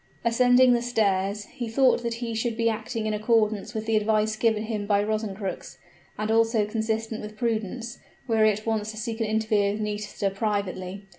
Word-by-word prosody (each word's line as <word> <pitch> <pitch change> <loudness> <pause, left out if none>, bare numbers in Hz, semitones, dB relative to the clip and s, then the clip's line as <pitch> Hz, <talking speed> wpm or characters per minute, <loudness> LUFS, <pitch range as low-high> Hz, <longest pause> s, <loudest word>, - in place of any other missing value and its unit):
Ascending 245 +2 +5
the 240 - +2
stairs, 205 -4 0
he 240 - -4
thought 255 +2 +3
that 235 -1 -2
he 235 -1 -4
should 225 0 -2
be 230 0 +1
acting 220 0 -2
in 215 - 0
accordance 215 -1 +1
with 220 0 -3
the 225 0 +1
advice 215 0 +2
given 220 -1 +1
him 215 -2 -3
by 205 -1 +3
Rosencrux, 210 -3 -4 0.4
and 215 +1 -1
also 225 -1 +3
consistent 220 +1 -2
with 210 0 -9
prudence, 230 0 -3 0.3
were 225 -2 +3
he 215 - +6
at 215 0 -2
once 220 -2 -1
to 220 - -7
seek 225 +1 -4
an 225 - +1
interview 215 -2 +1
with 210 - -5
Nisida 210 -1 -2
privately. 195 -2 -3
220 Hz, 190 wpm, -26 LUFS, 210-230 Hz, 0.4 s, he